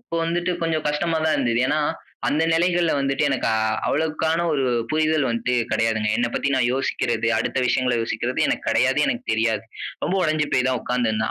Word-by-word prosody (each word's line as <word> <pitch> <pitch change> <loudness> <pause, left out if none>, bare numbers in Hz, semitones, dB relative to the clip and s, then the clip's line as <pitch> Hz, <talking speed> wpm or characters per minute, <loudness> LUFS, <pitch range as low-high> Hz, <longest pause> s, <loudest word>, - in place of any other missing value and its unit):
இப்ப 235 -8 -9
வந்துட்டு 175 +2 -1
கொஞ்சம் 160 -2 -1
கஷ்டமா 160 +3 0
தான் 160 - +2
இருந்தது. 120 -1 +1
ஏன்னா 150 +3 +1 0.5
அந்த 150 +3 +1
நெலைகள்ல 175 0 +2
வந்துட்டு 135 0 0
எனக்கு 135 -2 -1
அ 110 - +1 0.3
அவ்வளவுக்கான 160 +2 0
1 140 -3 0 0.3
புரிதல் 155 -2 +1
வந்துட்டு 120 +1 -1 0.2
கெடையாதுங்க. 110 -1 +1
என்னை 120 0 0
பத்தி - - 0
நான் 130 -2 +2
யோசிக்கிறது, 135 +1 -1
அடுத்த - - -1
விஷயங்கள 125 -1 +1
யோசிக்குறது, 115 +2 -2
எனக்கு - - -2
கெடையாது. - - +2
எனக்கு - - -2
தெரியாது. 110 0 0 0.4
ரொம்ப 175 - 0
ஒடைஞ்சு 155 -2 +1
போய் 125 0 +2
தான் 130 -1 0
உட்கார்ந்துருந்தேன். 110 -3 -1
140 Hz, 175 wpm, -22 LUFS, 120-160 Hz, 0.5 s, தான்